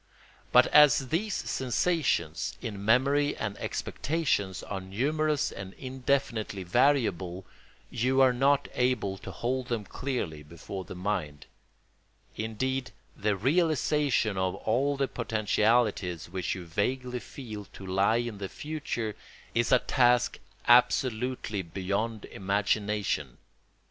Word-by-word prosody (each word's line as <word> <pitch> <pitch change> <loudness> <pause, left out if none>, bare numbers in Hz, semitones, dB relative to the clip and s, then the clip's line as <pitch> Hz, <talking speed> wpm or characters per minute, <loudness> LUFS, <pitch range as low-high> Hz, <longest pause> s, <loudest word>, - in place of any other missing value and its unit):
But - - +7
as 145 -3 +6
these 200 +6 0
sensations, 125 - 0
in 105 -4 -6
memory 140 +6 +3
and 105 -2 -3
expectation, 145 -11 -1
are 95 -2 -4
numerous 145 +10 0
and 95 -1 -8
indefinitely 130 -6 -2
variable, 95 -5 +1 0.5
you 130 +3 +1
are 130 -1 +6
not 140 +3 +3
able 115 -7 0
to - - -8
hold 125 +1 -2
them 115 -4 -2
clearly 100 - -4
before 85 +5 -8
the - - -8
mind; 90 -6 -3 0.9
indeed, 130 +4 -2 0.3
the 105 0 0
realisation 145 - +1
of 95 0 0
all 135 +8 0
the 135 0 +1
potentialities 110 - +1
which 95 0 -2
you 90 -2 -7
vaguely 125 +8 -1
feel 110 -6 -8
to 95 - -12
lie 95 +4 +2
in 120 -3 -2
the 95 -1 -4
future 145 -8 -4 0.4
is 120 0 +1
a 125 - +8
task 125 -1 +2 0.3
absolutely 125 -3 +3
beyond 100 +5 -3
imagination. 100 - -1
115 Hz, 115 wpm, -29 LUFS, 100-130 Hz, 0.9 s, a